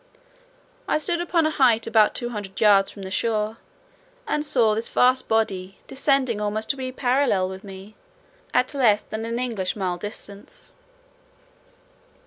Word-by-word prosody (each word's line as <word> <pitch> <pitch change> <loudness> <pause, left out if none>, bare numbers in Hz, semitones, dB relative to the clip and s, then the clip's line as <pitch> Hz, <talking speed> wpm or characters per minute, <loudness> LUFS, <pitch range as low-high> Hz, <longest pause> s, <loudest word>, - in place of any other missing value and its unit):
I - - +2
stood 340 +2 -2
upon 345 -2 +1
a 310 - +1
height 245 -7 +3
about 220 -2 +3
two 240 - -3
hundred 205 -4 -7
yards 200 -3 +5
from 200 - -10
the 190 - -7
shore, 215 +1 -1 0.7
and 300 - -1
saw 235 -7 +2
this 225 +2 -2
vast 255 +1 +3
body 195 -4 -1
descending 265 -5 0
almost 215 +1 -1
to 275 - -7
a 255 0 -4
parallel 250 -7 +1
with 190 0 -9
me, 195 +1 -11 0.6
at 255 - +1
less 225 -7 +3
than 220 +1 -6
an 230 +1 -3
English 230 -7 -2
mile 185 -4 -2
distance. 205 +1 -10
220 Hz, 150 wpm, -23 LUFS, 205-255 Hz, 0.7 s, yards